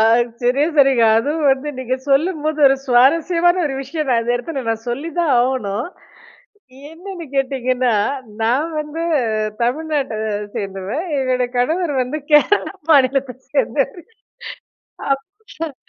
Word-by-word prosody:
ஆ - - +5 0.4
சரியா 265 +5 +2
சொன்னீங்க. 270 -5 +5
அதுவும் 295 +3 0
வந்து 270 +3 -4
நீங்க 255 0 -2 0.2
சொல்லும்போது 310 +1 +1
ஒரு 270 - +4
சுவாரஸ்யமான 335 +8 +3
ஒரு 270 - -3
விஷயம் 300 +2 -4
நான் 240 -2 +3
இந்த 240 - 0
இடத்தில 270 +1 -5
நான் 225 +1 -3
சொல்லி 280 +7 -4
தான் 325 -5 +2
ஆவணும். 245 - -1 1.0
என்னன்னு 350 +1 -8
கேட்டிங்கன்னா, 255 -2 0 0.5
நான் 265 +9 +1
வந்து 300 +2 -5 0.6
தமிழ்நாட்ட 290 0 -1 0.4
சேர்ந்தவ, 195 -1 -5 0.3
என்னோட 255 -1 0
கணவர் 315 +6 0
வந்து 275 +5 -4
கேரளா 300 +8 +4 0.2
மாநிலத்த 270 -3 +3 0.2
சேர்ந்தவரு. 285 +3 0 1.1
அப் 275 0 +1 0.3
சர் 320 -3 -5
275 Hz, 120 wpm, -19 LUFS, 250-310 Hz, 1.1 s, ஆ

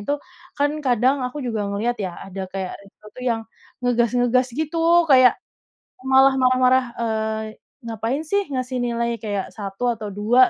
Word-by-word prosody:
itu 285 +8 -1 0.4
kan 285 0 +2
kadang 260 0 +2
aku 255 +2 -4
juga 220 -4 -2
ngelihat 215 +4 -2
ya 185 -3 -4
ada 190 -1 -6
kayak 190 -1 -4
resto 200 +1 -21
tuh - - -11
yang 240 -3 0 0.4
ngegas-ngegas 245 +1 +2
gitu, 330 +2 +3
kayak 255 -2 +7 0.7
malah 265 +1 +5
marah-marah, 255 0 +4
eee, 220 -1 -1 0.4
"Ngapain 230 +7 -2
sih 400 +6 +1
ngasih 255 -1 -3
nilai 235 -1 -1
kayak 205 -3 -3
1 200 +1 -6
atau 215 -2 -6
2?" 220 +6 +4
245 Hz, 150 wpm, -22 LUFS, 215-260 Hz, 0.7 s, kayak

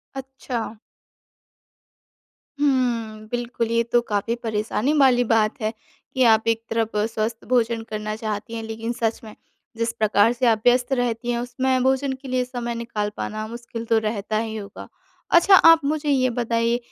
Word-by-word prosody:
अच्छा। 255 -4 -5 1.8
हम्म, 235 -6 0
बिल्कुल 240 -1 -2
ये 230 0 +2
तो 240 - +5
काफ़ी 225 +1 -2
परेशानी 220 +5 -1
वाली 255 -3 +5
बात 225 +1 +1
है 215 +1 -1 0.4
कि 260 - +2
आप 225 -1 +4
एक 225 0 +1
तरफ 225 -1 -1 0.2
स्वस्थ 225 +1 -3
भोजन 235 -2 +1
करना 215 0 -4
चाहती 215 +1 -5
हैं, 225 - -4
लेकिन 225 +1 -4
सच 225 -1 -1
में 215 - -11 0.4
जिस 230 0 0
प्रकार 215 0 +3
से 245 +1 -1
आप 220 -2 +3
व्यस्त 245 +2 +3
रहती 245 -1 -1
हैं, 235 - -1
उसमें 255 +1 0
भोजन 265 +1 +1
के 270 - -9
लिए 255 0 0
समय 240 -2 -4
निकाल 220 -3 -3
पाना 215 0 -4
मुश्किल 235 0 -7
तो 225 0 +2
रहता 215 0 -2
ही 220 0 -3
होगा। 200 -1 -8 0.5
अच्छा 385 +3 +6
आप 330 -2 +7
मुझे 300 0 -1
ये 255 -2 +3
बताइए 230 0 0
230 Hz, 165 wpm, -23 LUFS, 220-250 Hz, 1.8 s, आप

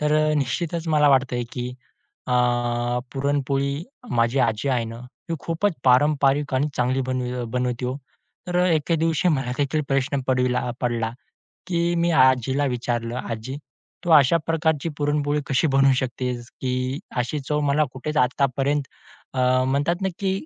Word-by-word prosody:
तर 150 0 +1
अ, 155 0 +2
निश्चितच 160 +5 -2
मला 150 -2 +4
वाटतंय 130 -2 +2
की 125 -1 -3 0.6
अ, 125 - 0 0.8
पुरणपोळी 140 +2 -1 0.3
माझी 115 +3 +2
आजी 115 +3 +1
आहे 120 -3 +1
ना, 115 +1 -8 0.3
ती 165 - -1
खूपच 170 +5 0
पारंपरिक 140 +1 +3
आणि 140 +3 +1
चांगली 125 +2 +1
बन 130 0 -1 0.3
बनवती 125 0 -1
हो. 125 +2 -2 0.5
तर 175 - -1
अ, - - +3
एके 165 0 +1
दिवशी 165 +2 +1
मला 135 -6 0
देखील 145 +2 0
प्रश्न 135 0 0
पडीला 125 -1 +2
अ, - - -1
पडला, 115 -2 -1 0.6
की 170 -1 +1
मी 170 0 +2
आजीला 130 +2 +2
विचारलं, 120 -2 -2
"आजी 115 +4 -5 0.5
तू - - -2
अशा 150 +1 +6
प्रकारची 160 -1 0
पुरणपोळी 145 0 0
कशी 140 +3 +2
बनवू 135 0 +5
शकतेस, 125 -2 -3
की 130 +1 -1 0.2
अशी 125 +5 -1
चव 150 0 +1
मला 150 +2 +3
कुठेच 150 +4 -4
आतापर्यंत 140 +2 +1 0.5
अ, 130 - -2 0.3
म्हणतात 145 +7 0
ना, 190 - +1
की 195 -1 0
135 Hz, 155 wpm, -23 LUFS, 125-150 Hz, 0.8 s, अशा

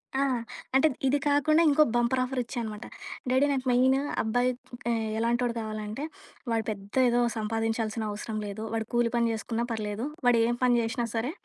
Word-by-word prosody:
ఆ! 270 - +2 0.5
అంటే 270 +4 +6 0.2
ఇది 280 - +3
కాకుండా 305 +3 +4
ఇంకో 305 +2 +6
బంపర్ 240 +2 +2
ఆఫరిచ్చానమాట. 240 -4 -4 0.4
"డాడీ 260 +3 +4
నాకు 265 -1 -1
మెయిను 260 +2 +4 0.2
అబ్బాయి 245 +3 +1 0.4
ఆహ్, 225 -1 0
ఎలాంటోడు 235 +1 +1
గావాలంటే, 215 +3 -4 0.5
వాడు 225 -1 +1
పెద్ద 200 -1 -6
ఏదో 240 0 +3 0.2
సంపాదించాల్సిన 225 0 -1
అవసరం 215 +1 -5
లేదు. 205 +2 -5
వాడు 225 -1 -1
కూలి 240 -1 +3
పని 235 0 +3
జేసుకున్నా 225 +2 -2
పర్లేదు. 215 +2 -3 0.2
వాడేం 235 0 +4
పని 250 -1 +5
జేషినా 235 +1 -1
సరే 235 +6 0
235 Hz, 150 wpm, -28 LUFS, 220-255 Hz, 0.5 s, అంటే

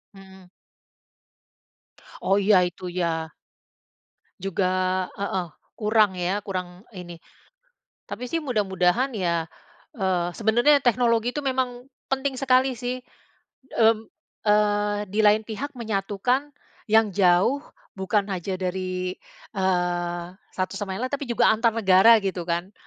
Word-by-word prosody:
Mmm. 190 -1 -15 1.8
Oh 195 - +2
ya, 195 -2 +5
itu 180 +1 -10
ya 165 -2 -2 1.1
juga 190 0 -1 0.5
heeh, 190 -3 -2 0.3
kurang 215 -1 +3
ya, 190 +4 -1
kurang 180 -1 -6
ini. 180 -3 -9 0.9
Tapi 250 - -5
sih 330 +6 -2
mudah-mudahan 210 - +1
ya, 170 -5 -1 0.5
eee, 185 -6 0
sebenernya 240 +6 +3
teknologi 235 -1 +2
itu 295 - -3
memang 255 -1 -1 0.2
penting 270 0 -1
sekali 260 0 +3
sih. 245 +2 -4 0.7
Mmm, 225 -1 +2 0.4
eee, 205 0 +2
di 215 - +1
lain 215 +1 +4
pihak 255 +6 -6
menyatukan 225 +6 -1 0.4
yang 220 -2 +4
jauh, 190 +8 +3 0.3
bukan 195 +1 0
aja 185 +1 -3
dari, 185 0 -3 0.4
eee, 175 -2 -1 0.3
satu 185 +1 -2
sama 195 -2 -4
yang 250 - -3
lain, 255 - -9
tapi 280 -2 -3
juga 235 -1 +4
antar 225 +1 +2
negara 200 +2 +6
gitu 185 -3 -2
kan. 175 +4 -2
205 Hz, 120 wpm, -24 LUFS, 185-235 Hz, 1.8 s, negara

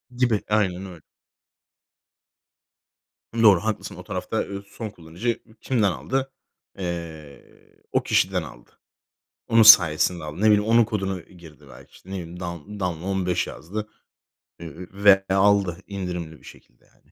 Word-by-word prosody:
Gibi. 120 -4 +1
Aynen 95 -3 0
öyle. 90 -4 -11 2.3
Doğru, 110 -5 +5
haklısın. 110 -1 -3
O - - -10
tarafta, - - -3
eee, 100 0 -7
son 110 +2 -7
kullanıcı 90 +4 -6 0.2
ü 110 - -21
kimden 110 -7 +1
aldı? 135 +8 -3 0.5
Eee, 85 -6 -8
o - - +1
kişiden - - +1
aldı. - - -13 0.8
Onun 115 0 +5
sayesinde 85 -5 +6
aldı. 75 0 -7
Ne - - +2
bileyim, 105 -1 +5
onun 115 +1 +5
kodunu 95 -4 -3
girdi 80 -5 -16
belki, 65 - -15
işte, 95 - -18
ne - - -6
bileyim, 90 -2 -7
"Dan 85 +3 -7
Danla 90 -3 -3
15" 95 -2 -1
yazdı, 105 +6 -7 0.7
eee, 80 -3 -9 0.2
ve 100 -1 +5
aldı 95 -2 +3
indirimli 90 -5 -5
bir - - -24
şekilde, - - -17
yani. - - -31
95 Hz, 140 wpm, -24 LUFS, 85-105 Hz, 2.3 s, sayesinde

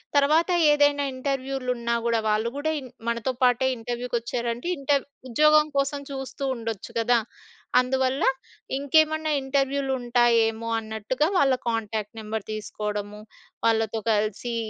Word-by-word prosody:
తర్వాత 305 +5 +4 0.2
ఏదైనా 290 -1 +3
ఇంటర్‌వ్యూలున్నా 255 -3 -2
గూడా, 230 -1 +2
వాళ్ళు 215 +2 +1
గూడా 310 +2 -1
ఇన్ 260 -3 -10 0.2
మనతో 235 +3 -1
పాటే 250 +1 +4
ఇంటర్‌వ్యూకొచ్చారంటే 240 +2 -3
ఇంటర్ 280 0 +1 0.3
ఉద్యోగం 305 +4 +5
కోసం 275 +1 0
చూస్తూ 270 0 -6
ఉండొచ్చు 225 -4 -6
కదా! 235 +1 +3 0.6
అందువల్ల 260 +1 0 0.6
ఇంకేమన్నా 315 +2 +2
ఇంటర్‌వ్యూలుంటాయేమో, 245 -5 +1
అన్నట్టుగా 220 +7 -1
వాళ్ళ 270 -2 +4 0.2
కాంటాక్ట్ 220 -1 -3
నెంబర్ 215 -1 -4
తీసుకోడము. 210 -1 -5 0.4
వాళ్ళతో 225 -1 +1
కలిసి 215 +3 -1
245 Hz, 105 wpm, -25 LUFS, 225-275 Hz, 0.6 s, ఉద్యోగం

